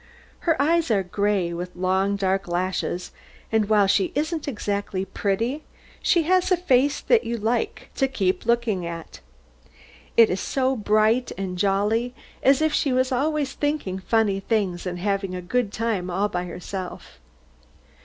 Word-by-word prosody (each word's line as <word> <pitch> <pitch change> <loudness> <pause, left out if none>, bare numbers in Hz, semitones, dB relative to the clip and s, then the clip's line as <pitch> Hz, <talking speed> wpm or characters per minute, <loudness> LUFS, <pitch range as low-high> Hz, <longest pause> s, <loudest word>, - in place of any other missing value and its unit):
Her 320 - +3
eyes 330 +2 +2
are 200 -4 +2
gray, 195 -1 0
with 180 +1 -6
long 190 +2 +1
dark 195 -1 0
lashes, 180 0 -2 0.4
and 220 -2 +2
while 210 -2 +5
she 195 0 +2
isn't 310 +2 -1
exactly 205 -5 -2
pretty, 230 +11 -1 0.4
she 340 -2 +3
has 370 +3 +2
a 365 - +5
face 285 -4 +2
that 470 -2 +3
you 235 0 -2
like 245 - -2
to 270 - +3
keep 205 -7 -1
looking 235 -6 +1
at. 170 -1 -7 1.0
It 230 -1 +7
is 185 - -1
so 265 0 0
bright 215 +2 +2
and 190 -1 -3
jolly, 205 +6 +1 0.3
as 270 +3 +4
if 315 -1 +2
she 280 - +1
was 255 +1 +1
always 285 +1 0
thinking 290 -11 -2
funny 205 -1 +1
things, 195 -4 -1
and 180 0 -3
having 195 0 -1
a - - -3
good 235 +3 0
time 215 -5 -2
all 195 +4 0
to 180 -1 -3
herself. 180 +1 -7
210 Hz, 155 wpm, -24 LUFS, 190-260 Hz, 1.0 s, It